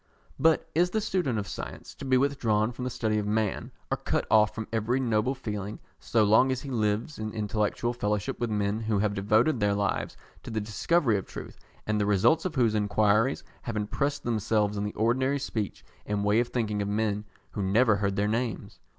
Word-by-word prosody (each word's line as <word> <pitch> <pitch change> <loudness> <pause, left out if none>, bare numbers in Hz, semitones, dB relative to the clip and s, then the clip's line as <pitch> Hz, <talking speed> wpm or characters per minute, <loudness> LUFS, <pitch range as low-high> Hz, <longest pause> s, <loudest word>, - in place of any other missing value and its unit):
But 160 0 +3
is 175 +2 +3
the 220 - 0
student 180 - 0
of 100 -2 -3
science - - -7
to - - -9
be 130 -1 +3
withdrawn 120 -5 +1
from 125 +1 -6
the - - -1
study 110 -3 0
of 105 - -3
man, 105 -1 -1 0.2
or - - +1
cut - - -1
off 105 -1 +5
from 110 -1 -4
every 115 +4 +1
noble 120 +1 +1
feeling, 105 -3 -5 0.2
so 115 -2 +2
long 110 +6 +5
as 130 -1 -2
he 140 - -6
lives 110 +4 -1
in 110 0 -3
intellectual 105 +2 -1
fellowship 105 -3 -2
with 120 - -1
men 105 0 0
who 110 -2 0
have 105 0 +1
devoted 110 +7 +2
their 105 -1 +2
lives 100 0 -1 0.2
to - - -9
the 110 - -1
discovery 110 - +1
of - - -10
truth, - - -9 0.3
and 105 -1 0
the 100 - +1
results 105 - +3
of 175 -4 -2
whose 120 -5 +3
enquiries 105 +4 +2 0.2
have 115 -3 -4
impressed 140 +7 -1
themselves 110 -2 +1
on 100 0 -2
the 105 - -4
ordinary 130 +5 +1
speech 115 -7 -4 0.2
and 105 0 -1
way 105 +2 +4
of 120 - +1
thinking 110 -4 -1
of 100 - -2
men 105 0 0 0.3
who 105 - -4
never 105 +3 +3
heard 100 -1 -1
their 100 +1 +1
names? 115 0 -3
110 Hz, 205 wpm, -28 LUFS, 105-125 Hz, 0.3 s, off